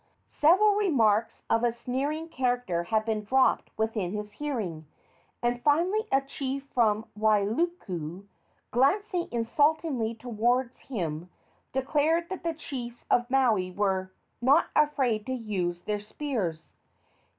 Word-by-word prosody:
Several 385 +8 +4
remarks 235 - +2
of 230 - +2
a 240 - +3
sneering 270 +7 -3
character 245 - -1
had 215 +3 +1
been 220 -2 -1
dropped 260 +5 +2
within 220 -4 -1
his 210 0 -5
hearing, 210 - -4 0.6
and 240 0 0
finally 355 - +2
a 270 - +4
chief 270 0 -4
from 220 -2 +2
Wailuku, 210 - 0 0.5
glancing 350 - +2
insultingly 250 0 +1
toward 240 +2 0
him, 175 - -4 0.4
declared 300 +5 +1
that 375 - -5
the 335 -1 -1
chiefs 245 -6 -7
of 240 0 +3
Maui 235 -9 +2
were 190 -1 -1 0.3
"not 275 +7 +4
afraid 265 -8 +2
to 260 - -1
use 185 -8 -2
their 210 -1 -2
spears." 205 - -4
240 Hz, 120 wpm, -28 LUFS, 210-290 Hz, 0.6 s, Several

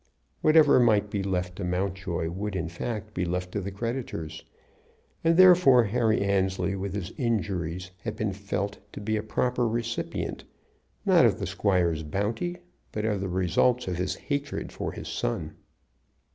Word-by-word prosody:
Whatever 155 -3 +6
might 105 -4 +3
be 100 - -1
left 90 -2 -2
to 100 - -4
Mountjoy 90 -2 -2
would 100 +3 -4
in 85 -3 -2
fact 105 +5 -5
be 90 - -1
left 90 +1 -2
to 100 - -2
the 100 - -4
creditors; 100 -7 -4 0.8
and 165 0 +4
therefore 180 -9 +7
Harry 110 +1 +1
Annesley 95 -1 +1
with 95 0 -4
his 100 0 -4
injuries 95 - -1
had 110 -2 -5
been 110 -2 -1
felt 100 +1 -3
to - - -6
be 110 +2 -1
a 105 - 0
proper 125 +3 0
recipient, 115 +1 -3 0.6
not - - +6
of - - +4
the - - -3
squire's 90 -5 +1
bounty, 105 - -2 0.3
but 105 0 -2
of 105 -3 0
the 95 - -2
results 95 +8 +2
of 90 -2 -2
his 90 +1 -1
hatred 145 0 -3
for - - -4
his - - -8
son. - - -2
100 Hz, 160 wpm, -27 LUFS, 90-115 Hz, 0.8 s, therefore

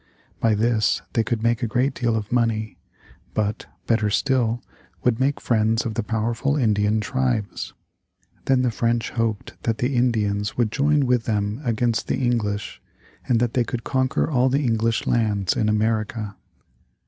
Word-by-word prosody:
By 115 -2 +3
this 110 0 +1
they 115 - +2
could 110 -1 -2
make 120 +1 +2
a 120 - 0
great 125 +5 +1
deal 120 -3 0
of 105 -2 -3
money, 115 -3 0 0.6
but, 105 -1 -1 0.2
better 110 -2 +2
still, 120 0 +1 0.4
would 120 -1 +2
make 140 +2 +1
friends 110 -1 +1
of 115 - -2
the 115 - -1
powerful 115 +6 -1
Indian 105 -4 +2
tribes. 120 -3 -2 0.7
Then 130 -1 +3
the 125 - +1
French 115 +1 0
hoped 115 -3 -3
that 115 -1 -1
the 130 +2 0
Indians 110 -4 0
would 120 -3 +1
join 145 +2 +2
with 125 -2 +1
them 105 +2 -1
against 115 -1 0
the - - 0
English 115 -5 -1 0.5
and 120 -3 +3
that 120 -1 0
they 125 - +2
could 120 0 -4
conquer 130 -1 0
all 130 -4 +2
the 140 +3 +1
English 115 -2 +1
lands 105 -5 +1
in 110 - +1
America. 110 -1 -1
115 Hz, 160 wpm, -23 LUFS, 110-125 Hz, 0.7 s, By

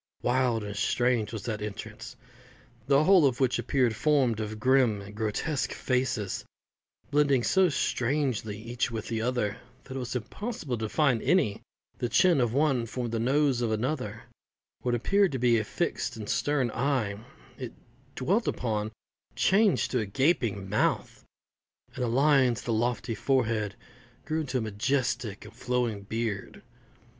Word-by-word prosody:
Wild 125 -3 +1
and 105 0 -6
strange 120 +1 +1
was 110 -4 -5
that 110 -3 -3
entrance, 105 +1 -7 0.7
the 140 +1 +5
whole 180 -3 +6
of 125 -3 -2
which 130 -2 +2
appeared 125 -5 +1
formed 130 -4 +2
of 110 0 -4
grim 130 -3 +3
and 100 +1 -10
grotesque 110 +7 -1
faces, 125 -6 -1 0.7
blending 140 -4 +3
so 190 +5 +4
strangely 125 -6 -1
each 120 +4 -2
with 115 -2 -5
the 115 -1 -1
other 115 -3 -1 0.3
that 130 - -9
it - - -2
was 125 -1 -4
impossible 145 - -4
to 110 - -2
define 135 -2 +2
any: 175 - +2 0.4
the 120 - -1
chin 150 +6 +4
of 120 -2 +1
one 135 -3 +1
formed 120 0 -4
the 115 - -1
nose 135 +1 +2
of 115 -2 0
another; 110 -1 -2 0.6
what 125 -1 0
appeared 195 - +2
to - - 0
be 120 -2 +3
a - - -1
fixed 110 - -2
and 105 -2 -6
stern 135 -2 +1
eye, 120 -7 0 0.4
if 125 -3 -5 0.4
dwelt 195 - +1
upon, 110 -3 -1 0.5
changed 200 +1 +3
to 125 - +1
a 110 - -1
gaping 115 - +1
mouth; 105 +2 0 0.7
and 125 - -3
the - - +1
lines 130 -2 +3
of - - -15
the 115 - 0
lofty 120 +1 0
forehead 110 -4 0 0.5
grew 160 0 -1
into 135 -4 -2
a - - 0
majestic 120 0 -1
and 110 - -12
flowing 125 -4 -1
beard. 110 0 -4
120 Hz, 155 wpm, -28 LUFS, 110-135 Hz, 0.7 s, whole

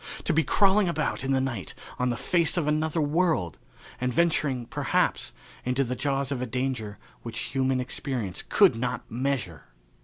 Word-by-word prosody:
To - - +2
be 160 +1 +3
crawling 200 +2 +4
about 170 - -1
in 135 - -1
the 135 - +3
night 125 -7 -3 0.2
on 125 0 +2
the 120 - -1
face 170 +3 +1
of 170 - +1
another 155 +2 +1
world 155 - +1 0.4
and 125 0 0
venturing, 140 -4 +1
perhaps, - - 0 0.3
into 125 +2 +1
the 125 0 -3
jaws 140 0 -1
of 130 -3 -2
a 125 - -2
danger 125 -4 -2 0.2
which 115 +1 -5
human 130 -1 +1
experience 125 -6 -3
could - - +5
not 125 +2 -2
measure! 120 - -2
130 Hz, 165 wpm, -27 LUFS, 125-150 Hz, 0.4 s, could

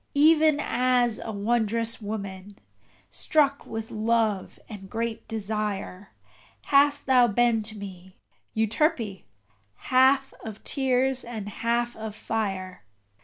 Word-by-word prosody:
Even 310 0 +5
as 250 -5 +1
a 225 - -5
wondrous 230 +2 0
woman, 200 -2 -6 0.5
struck 285 -2 +1
with 225 0 -6
love 220 -2 0
and 195 -3 -10
great 230 +1 -4
desire, 210 -3 -3 0.5
Hast 285 +1 +3
thou 255 -2 +5
been 235 +1 +2
to 215 0 -7
me, 190 -2 -10 0.4
Euterpe! 220 - 0 0.5
half 265 - +3
of 220 -1 -8
tears 265 -1 +1
and 220 -4 -6
half 235 +2 -1
of 220 -1 -6
fire. 195 -5 -3
225 Hz, 110 wpm, -26 LUFS, 205-255 Hz, 0.5 s, Even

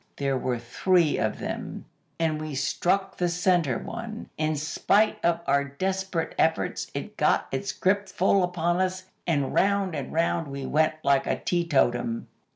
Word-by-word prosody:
There 140 -1 0
were 125 -1 -1
three 160 +8 +2
of - - 0
them, - - -5 0.3
and 155 -2 0
we 155 -2 -5
struck 190 +8 0
the 175 -1 +1
centre 170 -7 +2
one. 230 -1 -7
In 155 0 0
spite 200 +8 +1
of 170 0 +2
our 140 +1 +3
desperate 185 +4 -2
efforts, 160 0 +1
it - - -5
got - - +3
its - - -2
grip 200 0 +1
full 190 +2 +3
upon 175 -1 0
us, 185 0 -1 0.2
and 145 -5 +1
round 200 -2 +2
and 140 -4 -4
round 165 0 0
we 140 -1 -5
went 155 +3 +2
like 140 -1 +3
a - - +1
teetotum. 135 -9 +1
165 Hz, 160 wpm, -26 LUFS, 140-185 Hz, 0.3 s, our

